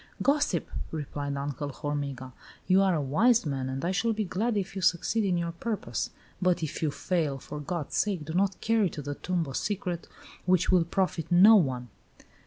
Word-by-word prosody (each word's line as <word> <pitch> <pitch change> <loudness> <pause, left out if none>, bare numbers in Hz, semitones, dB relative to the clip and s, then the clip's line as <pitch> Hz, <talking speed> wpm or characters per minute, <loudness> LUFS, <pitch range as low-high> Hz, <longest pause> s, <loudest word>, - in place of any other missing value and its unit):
"Gossip!" 280 - +2 0.2
replied 145 -2 -4
Uncle 145 +1 -3
Hormiga, 140 -3 -4 0.3
"you 185 +1 +5
are 190 -2 +3
a 155 - 0
wise 220 - +3
man, 135 -3 -2
and 135 +4 -3
I 180 - +1
shall 225 +4 +1
be 215 0 -1
glad 210 +4 -1
if 195 0 -3
you 190 - -3
succeed 180 +6 +2
in 185 -3 +1
your 170 0 -1
purpose. 170 - -3 0.3
But 180 -2 +2
if 155 - -4
you 155 - +2
fail, 155 -2 -1
for 150 +3 -7
God's 150 +1 -3
sake 190 -7 0
do 160 - -5
not 190 +1 +1
carry 220 -4 +2
to 150 - -7
the 145 +1 -3
tomb 175 +2 -2
a 135 - -7
secret 180 -1 -2 0.4
which 185 -1 +3
will 180 -3 +4
profit 180 -2 -1
no 195 +6 +8
one!" 130 - +1
170 Hz, 195 wpm, -28 LUFS, 145-195 Hz, 0.4 s, no